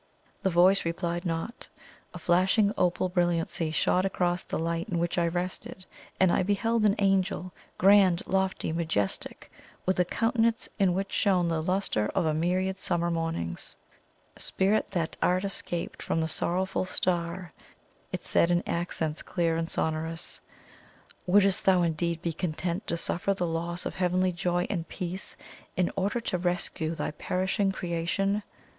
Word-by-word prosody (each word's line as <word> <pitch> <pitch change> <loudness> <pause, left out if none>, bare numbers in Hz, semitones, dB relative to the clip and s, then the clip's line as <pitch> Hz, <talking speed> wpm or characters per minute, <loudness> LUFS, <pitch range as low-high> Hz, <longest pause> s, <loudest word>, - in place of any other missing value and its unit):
The 190 - +2
voice 185 +3 +5
replied 170 +1 -2
not. 165 +7 -4 0.5
A - - -4
flashing 195 +4 +3
opal 180 +1 +1
brilliancy 175 -2 0
shot 180 +3 +2
across 180 -2 0
the - - -4
light 165 +4 -2
in 175 - -1
which 170 +1 0
I 170 - +2
rested, 180 +2 -4 0.3
and 185 -2 +5
I - - +3
beheld 215 +4 +1
an 200 - +3
Angel, 190 -2 +1 0.2
grand, 190 -2 +5
lofty, 190 -3 0
majestic, 160 - -2 0.3
with 185 0 +1
a - - +6
countenance 230 +3 +1
in 185 -3 +3
which 195 +1 -2
shone 185 -4 +2
the 165 -1 0
lustre 180 - 0
of 185 - +2
a 155 - +2
myriad 185 +4 0
summer 170 0 0
mornings. 165 - -3 0.6
"Spirit 195 +3 +1
that 170 -5 -2
art 180 +1 +2
escaped 175 -3 -3
from - - -1
the 160 - +1
Sorrowful 185 +4 -1
Star," 175 -1 -2 0.6
it - - -4
said 170 - +3
in 175 0 +2
accents 165 -2 -2
clear 170 -2 0
and 165 0 -2
sonorous, 160 +1 -2 0.9
"wouldst 195 0 +4
thou 185 -2 +5
indeed 170 +1 -1
be 170 - -1
content 175 +3 -2
to 170 - -1
suffer 180 +3 0
the 180 - -1
loss 170 +1 -3
of - - -3
heavenly 185 0 +1
joy 175 0 0
and 170 -5 -3
peace, 185 0 -4 0.4
in 180 -1 +2
order 200 +5 0
to 190 -6 -2
rescue 175 -2 -1
thy - - -2
perishing 190 +5 0
creation?" 190 +3 -1
180 Hz, 150 wpm, -28 LUFS, 170-190 Hz, 0.9 s, a